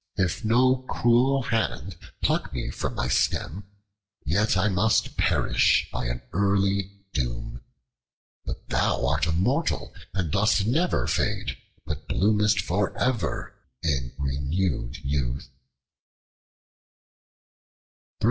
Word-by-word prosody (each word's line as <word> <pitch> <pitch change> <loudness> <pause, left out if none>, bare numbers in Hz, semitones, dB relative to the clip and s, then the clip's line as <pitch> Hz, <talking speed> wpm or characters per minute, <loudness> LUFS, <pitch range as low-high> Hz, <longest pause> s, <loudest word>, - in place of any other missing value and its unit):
If 95 +5 0
no 125 +4 +4
cruel 125 +3 +3
hand 100 - -1 0.3
pluck - - +1
me 60 - -3
from - - -3
my 60 - -1
stem, 95 +8 0 0.6
yet 100 +7 +2
I 95 +3 +3
must 105 +3 +2
perish - - +3
by - - -2
an 60 0 -4
early 100 0 +1
doom. - - -3 0.8
But - - -7
thou - - +1
art 70 +5 +1
immortal 120 - 0 0.2
and 95 -6 -2
dost 100 +1 +3
never 160 +11 +1
fade, 105 -2 -1 0.3
but - - -5
bloomest 105 0 +3
for 95 +3 -1
ever 125 -4 -1 0.3
in 65 -6 0
renewed 70 +1 -1
youth." 70 -3 -2
95 Hz, 105 wpm, -26 LUFS, 70-110 Hz, 0.8 s, no